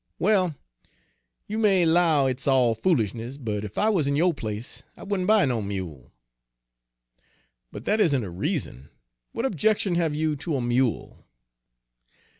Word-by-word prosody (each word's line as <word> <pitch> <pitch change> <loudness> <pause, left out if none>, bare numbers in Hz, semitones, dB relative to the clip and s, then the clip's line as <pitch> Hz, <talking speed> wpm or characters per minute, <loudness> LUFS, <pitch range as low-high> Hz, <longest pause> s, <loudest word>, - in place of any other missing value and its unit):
"Well, 185 -5 +2 0.9
you 215 +2 -4
may 195 -5 +4
'low 160 -4 +3
hit's 130 +1 -2
all 130 -4 +4
foolis'ness, 120 - -1
but 110 -6 -4
ef 105 0 -8
I 215 - +3
wuz 175 -10 +1
in 140 - +1
yo' 170 +4 +3
place, 110 -3 -6 0.2
I - - -11
wouldn' 195 -2 -2
buy 215 -1 +5
no 120 -4 -1
mule." 95 -10 -6 1.6
"But - - -9
that 215 +1 +2
isn't 145 - +2
a 95 - -6
reason; 105 - -4 0.4
what 230 - -3
objection 210 - +1
have 165 -3 0
you 155 0 0
to 145 +2 -3
a 130 - -1
mule?" 120 0 -1
145 Hz, 150 wpm, -25 LUFS, 115-185 Hz, 1.6 s, buy